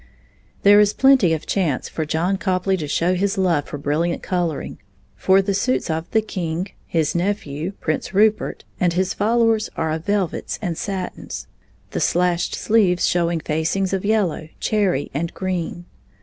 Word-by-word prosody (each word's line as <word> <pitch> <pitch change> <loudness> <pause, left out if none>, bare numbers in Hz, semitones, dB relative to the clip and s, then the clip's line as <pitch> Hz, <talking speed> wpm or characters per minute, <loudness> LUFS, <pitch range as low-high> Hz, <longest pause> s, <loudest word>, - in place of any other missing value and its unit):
There 205 +1 +7
is 210 0 +4
plenty 265 -10 +5
of 160 -1 -1
chance 165 -10 0
for 160 -2 -4
John 170 +5 0
Copley 190 0 0
to 155 -5 -4
show 170 +5 +1
his 195 +2 0
love 175 -6 +2
for 145 - -5
brilliant 155 +4 -1
coloring, 175 -5 -2 0.4
for 190 +1 +3
the 200 +1 0
suits 200 -2 0
of 160 +2 -3
the 220 -1 +2
king, 180 -2 -3 0.2
his 160 -3 0
nephew, 175 -2 -2
Prince 155 +1 -2
Rupert, 210 +2 +2 0.2
and 175 -2 +2
his 185 +1 0
followers 225 0 +2
are 160 -1 -1
of 160 +1 -3
velvets 200 -4 -1
and 175 -5 -3
satins, 190 +1 -5 0.5
the - - -2
slashed 175 0 +1
sleeves 200 -5 +2
showing 170 -1 +1
facings 160 +6 -1
of 190 - -1
yellow, 200 -7 0
cherry, 195 -10 0
and 165 +4 -2
green. 175 -2 -3
180 Hz, 160 wpm, -21 LUFS, 165-200 Hz, 0.5 s, There